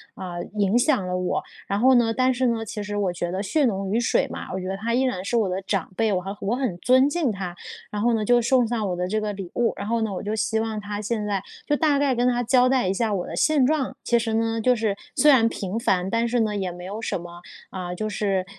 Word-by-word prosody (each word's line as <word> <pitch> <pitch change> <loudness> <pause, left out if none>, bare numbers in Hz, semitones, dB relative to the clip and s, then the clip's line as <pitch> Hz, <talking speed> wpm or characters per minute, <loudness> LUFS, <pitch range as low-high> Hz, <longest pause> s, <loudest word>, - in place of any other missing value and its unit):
啊， 180 -2 -6 0.2
影 205 +2 +3
响 255 - +2
了 180 - -2
我， 180 0 -1 0.2
然 200 - -1
后 260 +3 +5
呢， 230 -2 +3
但 255 +2 +2
是 255 0 +1
呢 225 -1 -1
其 210 0 -5
实 205 0 -5
我 190 -3 0
觉 175 0 -3
得 190 +2 -2
血 290 +8 +2
浓 195 -4 -1
于 225 - +2
水 235 - +1
嘛， - - -7
我 190 - -2
觉 185 - -5
得 190 +1 -3
她 230 +3 -2
依 250 - +2
然 250 -9 -1
是 235 - -2
我 205 -4 +2
的 185 +2 -2
长 195 -1 -2
辈， 220 0 +1
我 185 - 0
很 195 +2 -6
我 205 +5 0
很 250 -8 -1
尊 260 +6 +4
敬 300 -5 0
她， 185 -3 -5 0.4
然 210 - -3
后 235 +2 +3
呢， 220 -2 0
就 245 +2 +4
送 250 +1 +3
上 220 -3 -1
我 180 - -1
的 180 +1 -2
这 215 +3 0
个 210 -1 -2
礼 195 -3 -7
物。 240 -1 +1
然 200 - -5
后 230 0 0
呢 220 -2 -1
我 185 - -4
就 210 - -2
希 220 +1 0
望 220 -1 -3
她 205 0 -5
现 215 0 -2
在， 200 -2 -1 0.3
就 295 - +2
大 295 -2 +2
概 275 -3 +2
跟 240 +1 +1
她 245 0 +1
交 250 +1 +4
代 255 -7 +2
一 190 - +1
下 220 +1 0
我 180 -3 -2
的 - - -6
现 300 -4 +3
状， 290 -1 0
其 240 - +3
实 230 -1 -1
呢 225 0 0
就 250 +2 +4
是 215 -3 0 0.2
虽 300 - +6
然 230 -5 +5
平 195 0 -4
凡， 185 -4 +1
但 230 +2 +1
是 240 +1 0
呢 215 -2 0
也 190 -3 -2
没 180 +1 -9
有 205 +4 -5
什 230 - -2
么， 175 0 -10 0.3
啊， 180 -1 -5
就 215 +4 -3
是， 195 -2 -1
215 Hz, 305 characters per minute, -24 LUFS, 195-240 Hz, 0.4 s, 虽